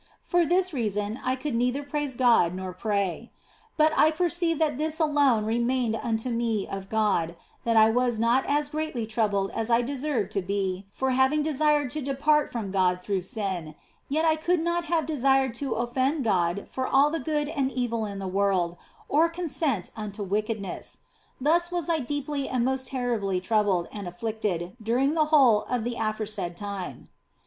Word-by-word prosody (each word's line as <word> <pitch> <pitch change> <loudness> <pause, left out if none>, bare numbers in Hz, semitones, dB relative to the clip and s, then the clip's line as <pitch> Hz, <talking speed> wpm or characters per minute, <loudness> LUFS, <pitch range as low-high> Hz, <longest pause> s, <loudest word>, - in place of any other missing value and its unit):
For 350 -2 +2
this 365 +1 +2
reason 210 -2 -2
I 255 +1 +1
could 265 +1 -4
neither 250 +4 0
praise 285 -2 -3
God 235 -9 +4
nor 185 0 -5
pray; 200 +1 -2 0.5
but 310 0 +4
I 310 - +5
perceived 335 0 0
that 300 -4 +1
this 315 +1 -1
alone 285 -8 +3
remained 235 +1 0
unto 225 +1 -2
me 230 -3 -1
of 195 0 -6
God, 200 -6 +1 0.3
that 230 -1 +2
I 220 0 +7
was 245 0 +1
not 235 +4 +3
as 290 0 +1
greatly 305 -6 -3
troubled 210 -3 0
as 225 0 -3
I 235 +1 +4
deserved 260 -5 -2
to 200 - -1
be 195 0 -2
for 265 +4 -1
having 265 +4 +3
desired 300 -2 +1
to 305 - -3
depart 290 +3 +1
from 215 -5 -4
God 180 -2 +1
through 195 -1 -1
sin, 185 -6 -3 0.3
yet 310 +4 +1
I 320 -1 +3
could 345 +2 +1
not 340 +1 0
have 330 -2 0
desired 270 -4 +2
to 275 -4 -1
offend 260 +5 0
God 185 -3 0
for 260 0 -3
all 280 +2 +4
the 325 - -1
good 300 -2 -1
and 280 -4 -1
evil 240 -3 -1
in 200 -1 -6
the 195 -1 -4
world, 185 -3 +1 0.3
or 320 +3 +3
consent 315 - -2
unto 210 -1 -5
wickedness. 210 +1 -3 0.4
Thus 340 +6 +2
was 350 -1 -2
I 325 - +2
deeply 285 +1 -3
and 250 -2 0
most 260 0 0
terribly 235 -8 -1
troubled 195 -3 +1
and 205 -3 -6
afflicted 185 -1 -3
during 250 +6 +1
the 315 -1 +3
whole 270 -9 +5
of 245 -3 0
the 240 +1 -2
aforesaid 215 -5 -2
time. 200 -2 -6
240 Hz, 175 wpm, -26 LUFS, 205-295 Hz, 0.5 s, I